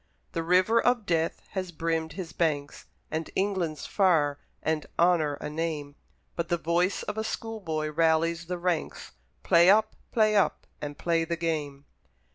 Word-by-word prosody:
The 165 - -2
river 185 +7 +4
of 245 -3 +2
death 165 -2 0
has 185 -2 -3
brimmed 165 0 -2
his 180 -2 -6
banks, 145 -4 -1 0.2
And 160 +1 -3
England's 190 -6 -1
far, 155 -8 +2 0.2
and 160 -1 -1
Honour 165 -4 +3
a - - -6
name, 150 -2 -3 0.4
But 170 0 -3
the 175 - +2
voice 170 +3 0
of 210 +1 -4
a - - -1
school 225 0 -4
boy 155 -5 -2
rallies 165 +1 +2
the 180 0 -2
ranks: 175 -2 -2 0.3
"Play 170 +1 +6
up! 215 +2 +4 0.2
play 215 -2 +3
up! 200 - +2 0.2
and 145 -1 -5
play 165 -1 +1
the 170 +1 -2
game!" 150 -4 -3
165 Hz, 160 wpm, -28 LUFS, 160-185 Hz, 0.4 s, Play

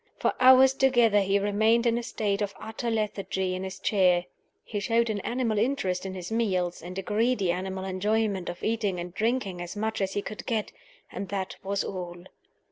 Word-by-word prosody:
For - - +1
hours 260 +1 +7
together 240 -6 +4
he 195 +1 +2
remained 220 +4 +2
in 230 -1 +3
a 240 - -1
state 210 -3 -2
of 200 -1 -2
utter 220 +2 -4
lethargy 200 -4 -1
in 185 +1 -4
his 190 0 -5
chair. 180 -4 +3 0.4
He 210 - -4
showed 230 +2 +1
an 205 - -2
animal 230 -1 -1
interest 200 -7 0
in 190 - -6
his 180 +2 -7
meals, 185 -6 0
and 180 +2 -8
a 195 - -3
greedy 210 -2 +1
animal 190 +1 -3
enjoyment 200 0 0
of 175 - -7
eating 210 -5 0
and 175 0 -6
drinking 215 -5 -1
as 175 +2 -6
much 220 0 -2
as 190 0 -1
he 205 - -2
could 215 - -7
get 220 -3 -1 0.4
and 195 - -5
that 195 -2 -3
was 200 +1 -1
all. 175 -2 -6
205 Hz, 195 wpm, -27 LUFS, 185-225 Hz, 0.4 s, hours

